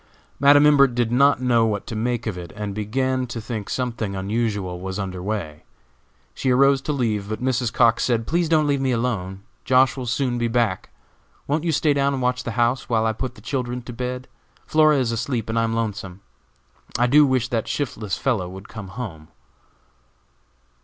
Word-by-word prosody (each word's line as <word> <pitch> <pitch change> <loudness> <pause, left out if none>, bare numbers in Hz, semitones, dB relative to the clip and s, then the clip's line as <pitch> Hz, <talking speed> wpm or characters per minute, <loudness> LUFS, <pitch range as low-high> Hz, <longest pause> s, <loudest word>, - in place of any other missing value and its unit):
Madam 145 +1 +6
Imbert 140 -4 +5
did 120 -2 0
not 130 +1 +4
know 120 -2 +3
what 105 -2 -2
to 115 - -6
make 115 +1 -1
of 110 -5 -2
it, 85 -2 -8
and 105 -1 -4
began 130 +5 -1
to 120 -1 -5
think 110 -2 -5
something 115 -6 -2
unusual 100 -2 -2
was 95 +1 -4
under 95 -2 -4
way. 90 -7 -4 0.7
She 130 - -2
arose 135 +1 +4
to 150 - -3
leave, 110 -7 -1
but 110 -1 -3
Mrs. 125 -2 0
Cox 115 -2 +3
said: 115 -3 +1
"Please 170 +3 0
don't 155 -2 +3
leave 140 -2 +1
me 135 - +1
alone. 105 -6 -2 0.2
Josh. 130 +1 +4
will 130 -2 -5
soon 125 0 0
be 120 - +1
back. 115 -5 0 0.6
Won't 150 +3 -1
you 165 - +2
stay 150 -1 +2
down 140 0 +1
and 135 - -2
watch 125 0 0
the 115 - -4
house, 120 +2 +1
while 110 -2 +2
I 110 - +1
put 125 +2 -5
the - - -15
children 125 -2 -3
to 120 - -8
bed? 125 +1 -4 0.4
Flora 155 -1 +4
is 125 -3 0
asleep, 115 0 -2
and 115 +1 0
I - - +2
am 115 - -2
lonesome. 100 -4 -4 0.8
I 120 - +3
do 145 +5 +6
wish 130 -3 +1
that 115 -4 -1
shiftless 110 -8 -3
fellow 105 -10 -1
would 95 +2 -10
come 105 -3 -8
home." 90 -7 -7
120 Hz, 195 wpm, -22 LUFS, 105-130 Hz, 0.8 s, Madam